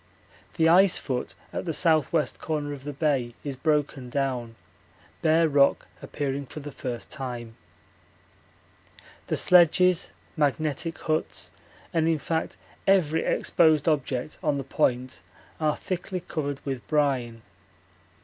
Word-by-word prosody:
The 160 - +3
ice 180 +3 +6
foot 125 -3 -3 0.2
at - - -3
the - - -4
S.W. 155 -1 +2
corner 150 -2 -3
of 140 -1 -10
the 145 - -3
bay 135 -5 0
is 140 -2 -4
broken 145 -2 -1
down, 125 -4 -2 0.7
bare 160 +1 +4
rock 140 -2 +3 0.2
appearing 140 -1 -3
for 155 - -8
the 145 0 -8
first 125 -4 -6
time. 120 -5 -6 1.7
The - - -1
sledges, 180 0 +4 0.3
magnetic 155 +1 0
huts, 155 -1 -3 0.4
and 165 -1 +2
in 165 -1 +2
fact 160 +2 -3 0.3
every 160 -5 +3
exposed 160 -3 +3
object 140 -3 -1
on 150 -5 +1
the 135 - -3
Point 130 -1 -1 0.4
are 155 -1 +1
thickly 185 0 -4
covered 145 -5 -4
with 135 -3 -4
brine. 130 -7 0
145 Hz, 125 wpm, -26 LUFS, 135-160 Hz, 1.7 s, ice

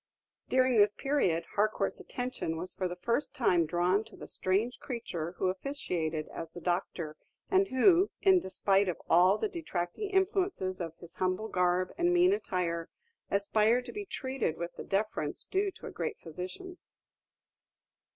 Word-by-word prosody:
During 255 -2 +4
this 205 0 +5
period, 185 - +1
Harcourt's 205 -1 +1
attention 245 -10 -4
was 180 +3 -3
for 185 - -1
the 175 - -5
first 235 +10 -1
time 175 -10 +3
drawn 180 +5 +2
to 220 - -14
the - - -9
strange 205 +6 0
creature 175 - -4
who 185 - -3
officiated 180 - -2
as 165 - -6
the 175 - -9
doctor, 175 -3 -2 0.3
and 385 0 +4
who, 360 +8 +5
in 380 -2 +5
despite 195 - +2
of 175 - -3
all 180 +4 +6
the - - 0
detracting 325 - -3
influences 380 - 0
of 165 -2 -4
his 170 - -11
humble 185 +4 0
garb 180 0 +1
and 350 0 +3
mean 360 +2 +5
attire, 175 - -2 0.4
aspired 215 +4 +2
to - - -6
be 415 -1 -5
treated 260 - -2
with 170 0 -4
the - - -6
deference 195 -7 -1
due 395 +1 0
to - - -12
a - - -6
great 455 - -3
physician. 185 - -7
200 Hz, 160 wpm, -31 LUFS, 175-275 Hz, 0.4 s, all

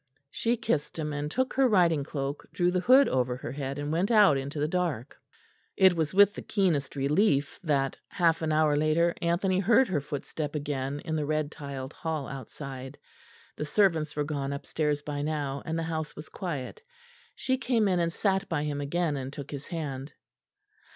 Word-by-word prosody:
She 235 +1 0
kissed 155 -10 -1
him 150 -2 -2
and 145 +1 -3
took 260 - -1
her 270 0 +4
riding 170 - +3
cloak, 140 0 -4
drew 175 -1 +1
the 180 - +1
hood 260 +8 +6
over 125 - 0
her - - -6
head, 140 0 -4
and 145 +1 -3
went 175 +5 +1
out 210 -9 +6
into 140 +2 -3
the 150 - +1
dark. 165 -8 -2 0.6
It 190 -2 +6
was 160 -2 0
with 200 +1 +6
the - - -7
keenest 170 -10 0
relief 145 +1 +1
that, 140 -4 0
half 165 -2 +2
an 160 -1 0
hour 155 -1 +3
later, 155 +3 +2
Anthony 185 +2 +1
heard 230 +6 +4
her 155 -6 0
footstep 145 +1 -5
again 145 -1 -3
in 160 -2 -3
the 150 - -1
red 155 -1 0
tiled 140 -2 -7
hall 160 -5 -3
outside. 135 +1 -8 0.6
The 150 - -2
servants 160 -4 +2
were 150 - 0
gone 140 -2 -3
upstairs 145 +1 -1
by 145 -1 -3
now, 145 -2 -2
and 165 0 -1
the 165 - -1
house 160 -1 -3
was 150 - -9
quiet. 160 - -5 0.5
She 260 -1 -1
came 235 -4 +2
in, 180 -2 +2
and 170 -1 +1
sat 195 +2 0
by 150 -3 0
him 145 -1 -2
again 155 +2 0
and 135 -1 -4
took 140 0 -8
his 140 -1 -6
hand. 145 -5 -5
155 Hz, 190 wpm, -28 LUFS, 140-175 Hz, 0.6 s, hood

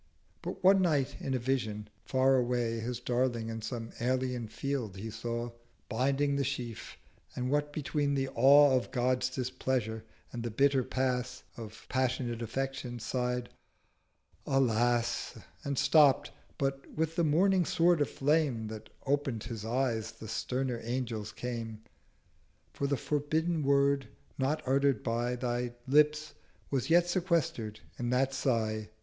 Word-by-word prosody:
But - - -6
one 190 +1 +6
Night 140 -6 +1
in 135 - -2
a - - +2
Vision, 115 -5 -2 0.2
far 130 0 +3
away 120 -2 0
His 120 +1 -3
darling 120 -2 0
in 115 0 -5
some 115 0 -5
alien 125 -1 -1
Field 115 -3 -3
he 110 +3 -5
saw 120 +2 -4 0.4
Binding 140 +4 +1
the 140 - +1
Sheaf; 120 -3 -5 0.4
and 125 +1 -2
what 145 0 +1
between 145 -1 -1
the 135 -1 0
Awe 140 +3 +6
Of 125 - 0
God's 125 0 +1
Displeasure 130 -3 -2 0.3
and 120 - -4
the 120 - -3
bitter 135 +3 +3
Pass 130 -1 -1
530 110 -1 -10
Of - - -24
passionate 125 -2 -1
Affection, 125 +1 -3
sigh'd 125 +1 -2 1.0
'Alas—' 120 -2 +1 0.3
And 140 -1 -2
stopp'd—But 135 -2 +2
with 160 +1 -1
the 170 - +2
morning 180 +5 +4
Sword 170 -1 +3
of 145 - +2
Flame 135 -6 +1
That 110 -1 -8 0.2
oped 135 -5 0
his 115 -4 -6
Eyes 115 -1 -1
the 110 -1 -10
sterner 125 +2 -2
Angel's 115 -3 -3
came 115 -3 -5 0.9
'For 140 - -1
the 140 -1 +1
forbidden 155 +5 0
Word 140 -2 +3 0.3
not 135 +4 0
utter'd 135 -3 +2
by 120 +2 0
Thy 120 -1 -2
Lips 150 +2 +3 0.4
was 135 0 0
yet 175 +1 +5
sequester'd 170 - 0 0.2
in 120 -1 -1
that 130 +2 +2
Sigh.' 110 -5 0
130 Hz, 140 wpm, -31 LUFS, 120-140 Hz, 1.0 s, one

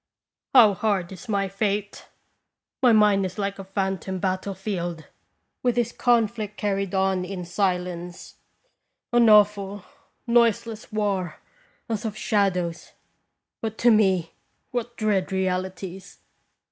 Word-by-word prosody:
How 220 -5 +8
hard 195 -3 -1
is 195 +5 -11
my 200 -2 +1
fate! 200 +1 -3 0.7
My 250 -2 +6
mind 210 -3 +4
is 185 +1 -4
like 200 -1 -3
a - - -5
phantom 190 0 -3
battle 190 +1 -2
field, 175 -5 -4 0.6
with 245 -2 +1
this 240 -1 0
conflict 225 -4 0
carried 195 -2 -1
on 190 -1 +1
in 180 -1 -5
silence 180 -1 -3 0.8
an 240 -2 +5
awful, 205 -2 +4 0.4
noiseless 230 -2 +1
war, 200 -6 -1 0.5
as 220 -3 -3
of 215 -2 -4
shadows; 180 -6 -1 0.7
but, 220 -1 -4
to 240 - +4
me, 190 -6 +2 0.4
what 240 -1 -4
dread 205 -3 0
realities 190 0 -3
200 Hz, 120 wpm, -24 LUFS, 185-215 Hz, 0.8 s, How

